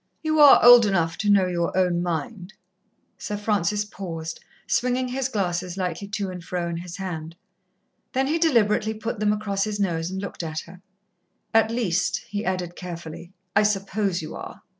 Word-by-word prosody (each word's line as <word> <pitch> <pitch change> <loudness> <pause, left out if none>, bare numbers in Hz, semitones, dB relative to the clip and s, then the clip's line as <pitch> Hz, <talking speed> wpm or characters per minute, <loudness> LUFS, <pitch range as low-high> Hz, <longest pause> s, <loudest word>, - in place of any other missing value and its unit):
"You 310 -1 +1
are 290 -4 +8
old 240 -2 +9
enough 165 -4 +1
to 210 - 0
know 200 -2 +5
your 175 0 -1
own 180 -2 +2
mind." 180 +3 -4 0.6
Sir 210 - -4
Francis 205 -1 0
paused, 165 -5 -6 0.3
swinging 250 +1 0
his 260 +1 -2
glasses 180 -4 -2
lightly 185 +1 -3
to 200 -1 -3
and 180 -2 -8
fro 175 0 -3
in 170 -1 -3
his 175 0 -7
hand. 165 -4 -5 0.8
Then 265 +1 +1
he 315 +4 0
deliberately 220 -8 +2
put 225 0 -4
them 210 0 +2
across 205 -2 -1
his 210 -1 -4
nose 170 -4 -1
and 190 +1 -4
looked 200 -1 -5
at 160 -1 -4
her. 180 +1 -14 0.7
"At 225 0 +4
least," 210 -7 0
he 205 +1 -3
added 180 -3 -2
carefully, 170 -1 -8 0.2
"I 205 - +6
suppose 195 -3 0
you 155 - -7
are. - - -9
195 Hz, 175 wpm, -24 LUFS, 175-215 Hz, 0.8 s, old